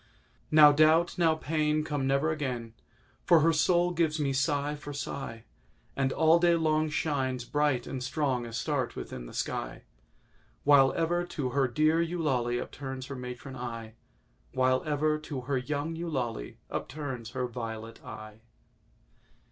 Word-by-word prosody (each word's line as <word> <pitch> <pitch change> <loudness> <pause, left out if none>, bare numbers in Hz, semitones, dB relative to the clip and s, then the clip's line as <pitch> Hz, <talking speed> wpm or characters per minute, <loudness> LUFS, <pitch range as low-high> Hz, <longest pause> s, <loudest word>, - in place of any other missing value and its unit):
Now 150 -1 +8
Doubt—now 160 +2 +4
Pain 155 -1 0
Come 145 -3 -2
never 140 +3 +2
again, 125 -7 -3 0.5
For 170 -3 +5
her 165 +2 +4
soul 175 +3 +3
gives 165 -2 0
me 140 -2 0
sigh 140 +2 0
for 145 0 -7
sigh, 135 -5 -5 0.5
And 135 -1 +1
all 160 +3 +4
day 170 0 +4
long 155 -1 +1
Shines, 135 -5 -1
bright 145 -3 +1
and 130 -2 -5
strong, 130 -3 -1
Astarté 130 +2 -2
within - - -7
the - - -11
sky, - - -3 0.8
While 140 -2 +6
ever 170 +1 0
to 160 -7 -3
her 135 0 +2
dear 155 +6 +2
Eulalie 140 -8 0
upturns 130 0 -6
her 140 - -5
matron 125 +1 -7
eye— 115 -3 -6 0.6
While 130 0 +2
ever 155 +1 +1
to 145 -3 -6
her 130 +1 -1
young 145 +5 -3
Eulalie 130 - -3
upturns 130 -5 -5
her 125 - 0
violet 115 -2 -6
eye. 110 0 -10
145 Hz, 140 wpm, -29 LUFS, 125-155 Hz, 0.8 s, Now